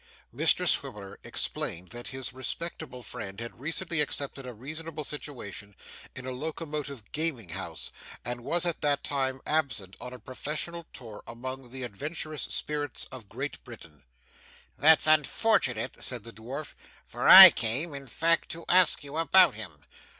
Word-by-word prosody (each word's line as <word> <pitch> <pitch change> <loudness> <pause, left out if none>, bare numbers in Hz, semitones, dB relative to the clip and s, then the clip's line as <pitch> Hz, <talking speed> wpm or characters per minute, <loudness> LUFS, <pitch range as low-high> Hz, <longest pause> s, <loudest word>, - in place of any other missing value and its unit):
Mr - - +4
Swiveller 100 -2 -1
explained 90 +2 -3
that 120 +1 -8
his 130 -2 -6
respectable 130 0 -6
friend 95 -1 -7
had 115 0 -8
recently 165 +3 -1
accepted 140 -2 -2
a - - -5
responsible 155 +6 -6
situation 110 -9 -7 0.4
in 130 - -7
a 130 - -4
locomotive 145 -3 -5
gaming 150 - -2
house, 85 -1 -6 0.3
and 120 0 -4
was 175 +6 0
at 170 -2 -2
that 145 -1 +1
time 135 -2 -1
absent 120 -12 -1
on 125 - -7
a 125 - -8
professional 155 +6 -5
tour 110 -4 -8
among 130 +2 -7
the 130 +1 -6
adventurous 150 - -4
spirits 145 -3 -1
of 120 -6 -11
Great 135 +5 -5
Britain. 85 - -13 0.7
'That's 155 +3 +5
unfortunate,' 155 - +2
said 125 -4 -1
the 115 +1 -10
dwarf, 130 +7 -7 0.3
'for - - -1
I - - +14
came, 125 +8 -1
in 140 -1 -7
fact, 165 +6 +2
to 165 0 -8
ask 180 -4 +5
you 145 +2 -7
about 180 +3 +5
him. 90 -9 -10
135 Hz, 150 wpm, -28 LUFS, 115-155 Hz, 0.7 s, I